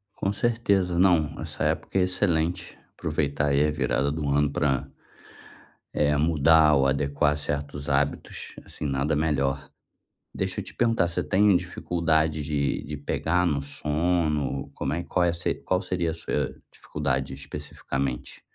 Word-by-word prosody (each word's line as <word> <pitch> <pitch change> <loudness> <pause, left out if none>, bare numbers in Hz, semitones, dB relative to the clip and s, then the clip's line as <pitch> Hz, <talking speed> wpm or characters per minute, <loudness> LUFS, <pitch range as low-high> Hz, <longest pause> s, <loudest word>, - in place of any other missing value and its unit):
Com 95 - -1
certeza, 100 -5 +1
não, 85 -5 +3
essa - - -4
época - - -1
é - - +4
excelente, 90 -2 0 0.2
aproveitar 75 -2 -1
aí 70 +1 +3
a 75 - +1
virada 70 -1 0
do 75 -1 -3
ano 70 +1 +3
para, 70 -2 0 1.1
eh, 75 0 +2
mudar 80 0 +5
ou 70 -1 +3
adequar 70 +2 +1
certos 75 0 -4
hábitos, 70 +1 -1
assim, - - -8
nada 70 +2 0
melhor. 70 -3 0 0.6
Deixa - - -2
eu - - -3
te - - -8
perguntar, 115 -7 +2
você 85 - -2
tem 100 0 +4
dificuldade 80 -3 0
de 70 -1 -1
de 75 0 -6
pegar 80 +4 0
no 75 -5 +1
sono? 75 -1 -1
Como - - -2
é 85 +2 -2
qual 85 0 +1
se 85 0 -1
qual 95 0 -1
seria 90 -3 -1
a - - -4
se 85 - -2 0.2
dificuldade 70 -2 -2
especificamente 70 -2 -5
75 Hz, 145 wpm, -26 LUFS, 70-85 Hz, 1.1 s, mudar